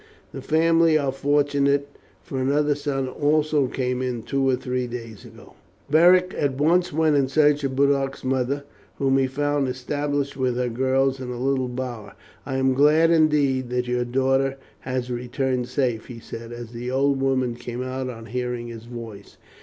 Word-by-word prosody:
The - - -7
family 165 0 +3
are 140 -3 0
fortunate, 140 0 +1 0.4
for 135 -1 -4
another 145 +3 +2
son 140 -2 -2
also 150 +1 +1
came 125 -1 -2
in 125 -3 -3
two 135 +2 0
or 130 - +3
three 125 0 -3
days 115 -3 -8
ago." - - -15 0.4
Beric 180 +3 +5
at 135 -3 -1
once 170 +5 +2
went 155 0 +2
in 140 -2 +3
search 145 +1 +3
of 135 -1 -2
Boduoc's 140 0 +1
mother, 130 +2 -1 0.3
whom 135 -1 +2
he 135 - +2
found 145 +1 0
established 140 +2 -2
with 130 -2 0
her 125 0 -1
girls 130 +2 +1
in 130 -1 -6
a 125 - -5
little 130 -1 0
bower. 120 -5 -6 0.3
"I 135 -1 -2
am 130 0 +2
glad 150 +4 +4
indeed 145 -6 +2
that 125 0 -1
your 125 0 0
daughter 135 +2 +1 0.2
has 125 -1 -3
returned 125 +1 -2
safe," 125 -4 -1
he 120 - -9
said, 115 0 -9
as 120 -1 -8
the 120 +1 -5
old 135 +1 +1
woman 130 -2 +1
came 120 +1 -6
out 130 0 -4
on 115 -2 -8
hearing 125 0 -4
his 115 -1 -9
voice. 115 -4 -10
130 Hz, 175 wpm, -23 LUFS, 125-145 Hz, 0.4 s, Beric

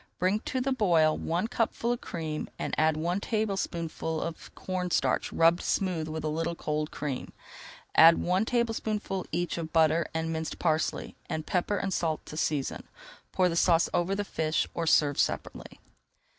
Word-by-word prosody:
Bring 190 +4 +1
to 260 - -1
the 265 +2 0
boil 170 -11 +3
one 175 +6 -1
cupful 235 0 -1
of 240 - -2
cream 155 -2 -4
and - - -4
add 155 0 +2
one 175 +4 0
tablespoonful 180 -7 -2
of 165 0 -5
corn 185 -1 -3
starch - - +1
rubbed 165 +1 +4
smooth 180 -5 -1
with 155 0 -4
a - - -1
little 165 +2 -1
cold 150 -1 -2
cream. 140 -4 -4 0.6
Add 165 +1 +8
one 185 +3 +1
tablespoonful 220 -5 -1
each 175 +1 -1
of 160 -1 -5
butter 160 0 +3
and 160 0 -2
minced 160 0 -4
parsley, 160 -2 -1
and 155 -1 -3
pepper 195 +2 0
and 195 -1 -2
salt 160 -3 -1
to - - -9
season. 150 -3 -2 0.4
Pour 185 -1 +3
the 170 - -1
sauce 170 -1 +4
over 175 +3 +1
the 205 - -1
fish 160 -4 0
or 165 -1 -2
serve 145 -2 +3
separately. - - -2
170 Hz, 170 wpm, -29 LUFS, 160-190 Hz, 0.6 s, Add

